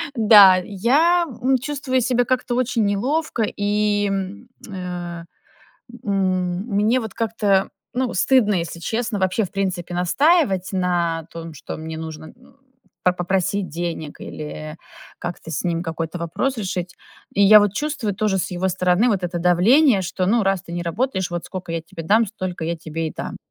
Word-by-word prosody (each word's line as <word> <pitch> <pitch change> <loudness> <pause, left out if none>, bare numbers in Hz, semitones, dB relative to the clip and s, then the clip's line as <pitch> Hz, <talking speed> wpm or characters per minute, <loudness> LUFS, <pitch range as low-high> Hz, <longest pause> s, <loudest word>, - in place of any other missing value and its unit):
Да. 205 -4 +8
Я 295 - +3 0.2
м 260 +1 +3
чувствую 260 -1 -1
себя 245 0 +1
как-то 250 -1 -1
очень 240 -3 +1
неловко, 245 +5 0
и, 205 0 0
м, 195 +5 -4 0.2
э, 175 -3 -6 0.8
м, 185 -3 0
мне 215 +5 +2
вот 220 - -6
как-то, 210 -4 +1 0.3
ну, 255 -1 -1
стыдно, 245 -6 +3
если 170 0 -4
честно, 225 +2 -2
вообще, 190 +3 +1
в - - -9
принципе, 185 -3 -2
настаивать 190 - +2
на 170 -3 0
том, 165 -1 -8
что 145 - -7
мне 160 0 -6
нужно 160 -1 -7
н 250 +2 -18 0.5
по 180 - +4
попросить 185 +1 -1
денег 165 -2 -5
или 155 +1 -7 0.4
как-то 170 -2 -6
с 165 - -3
ним 170 -1 -1
какой-то 165 0 -4
вопрос 235 +11 -2
решить. 185 -3 -3 0.4
И 200 - +3
я 210 +2 +9
вот 205 -1 +1
чувствую 280 -9 -2
тоже 195 -2 0
с - - -2
его 185 +2 -1
стороны 185 +5 +2
вот 195 -5 0
это 175 0 -3
давление, 200 - +4
что 185 +1 -2
ну: 225 +2 +3
"Раз 195 -2 +1
ты 170 - -11
не 175 0 -3
работаешь, 190 +1 -1
вот 175 -1 -4
скока 180 -3 -6
я 165 -1 -2
тебе 165 0 -9
дам, 220 +5 +4
столько 185 -5 -5
я 170 +1 -2
тебе 160 0 -4
и - - -9
дам". - - -5
190 Hz, 170 wpm, -21 LUFS, 175-225 Hz, 0.8 s, я